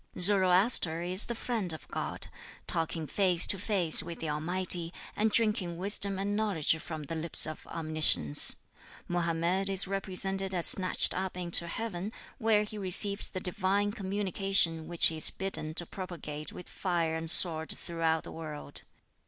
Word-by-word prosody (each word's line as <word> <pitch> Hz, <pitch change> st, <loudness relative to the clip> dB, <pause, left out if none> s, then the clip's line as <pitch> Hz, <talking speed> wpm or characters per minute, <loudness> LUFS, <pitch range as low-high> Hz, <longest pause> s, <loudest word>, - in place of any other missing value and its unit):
Zoroaster 185 Hz, -2 st, +3 dB
is 185 Hz, +3 st, +2 dB
the 235 Hz, -, -5 dB
friend 225 Hz, -6 st, -4 dB
of 160 Hz, -, -11 dB
God, -, -, -6 dB, 0.4 s
talking 165 Hz, -1 st, -3 dB
face 180 Hz, 0 st, +2 dB
to 195 Hz, -, -2 dB
face 185 Hz, -6 st, +4 dB
with 170 Hz, 0 st, -9 dB
the 160 Hz, -2 st, -5 dB
Almighty, 170 Hz, +2 st, -1 dB, 0.2 s
and 215 Hz, +1 st, 0 dB
drinking 210 Hz, -6 st, -1 dB
wisdom 200 Hz, +1 st, 0 dB
and 200 Hz, +1 st, -4 dB
knowledge 200 Hz, -8 st, -1 dB
from 160 Hz, -1 st, -9 dB
the 145 Hz, -, -8 dB
lips 165 Hz, 0 st, +3 dB
of 155 Hz, 0 st, -9 dB
Omniscience. 155 Hz, -, +4 dB, 0.5 s
Mohammed 175 Hz, +2 st, -2 dB
is 195 Hz, 0 st, +3 dB
represented 195 Hz, 0 st, -2 dB
as 175 Hz, -, +2 dB
snatched 185 Hz, -1 st, +6 dB
up 185 Hz, -1 st, -6 dB
into 170 Hz, -1 st, +3 dB
heaven, 205 Hz, 0 st, -6 dB, 0.3 s
where 220 Hz, -3 st, +1 dB
he 210 Hz, 0 st, -9 dB
receives 200 Hz, +1 st, 0 dB
the 185 Hz, -, -7 dB
Divine 195 Hz, +2 st, -2 dB
communication 195 Hz, -5 st, -2 dB
which 170 Hz, 0 st, +5 dB
he 160 Hz, -, +4 dB
is 155 Hz, -, +6 dB
bidden 170 Hz, -5 st, -5 dB
to 175 Hz, -, 0 dB
propagate 165 Hz, -5 st, -9 dB
with 180 Hz, -, -12 dB
fire 170 Hz, -4 st, -3 dB
and 160 Hz, 0 st, -4 dB
sword 160 Hz, -2 st, +5 dB
throughout 165 Hz, -1 st, -3 dB
the -, -, -11 dB
world. 155 Hz, -2 st, -8 dB
180 Hz, 155 wpm, -28 LUFS, 165-195 Hz, 0.5 s, snatched